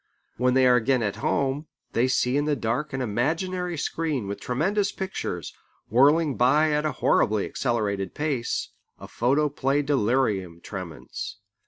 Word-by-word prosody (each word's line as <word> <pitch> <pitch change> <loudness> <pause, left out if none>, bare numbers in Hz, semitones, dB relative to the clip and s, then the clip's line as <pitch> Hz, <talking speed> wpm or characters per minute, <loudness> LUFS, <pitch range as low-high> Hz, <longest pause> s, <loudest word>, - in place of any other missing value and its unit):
When 125 +1 +2
they 130 -1 +5
are 125 -1 +6
again 125 +1 +2
at 105 -2 -2
home, 140 +2 -1 0.3
they 120 +2 +3
see 130 0 +1
in 145 +1 +1
the 150 -1 +1
dark 125 +5 -2
an 130 -1 -2
imaginary 170 - -1
screen 150 -5 -2
with 100 - -4
tremendous 190 +11 0
pictures, 190 - -4 0.4
whirling 145 +4 +4
by 150 +6 +4
at 150 +1 +1
a - - -1
horribly 105 -1 +2
accelerated 105 -6 -2
pace, 145 -6 -1 0.3
a - - -9
photoplay 140 +2 +1
delirium 110 - 0
tremens. - - -7
130 Hz, 145 wpm, -25 LUFS, 120-150 Hz, 0.4 s, are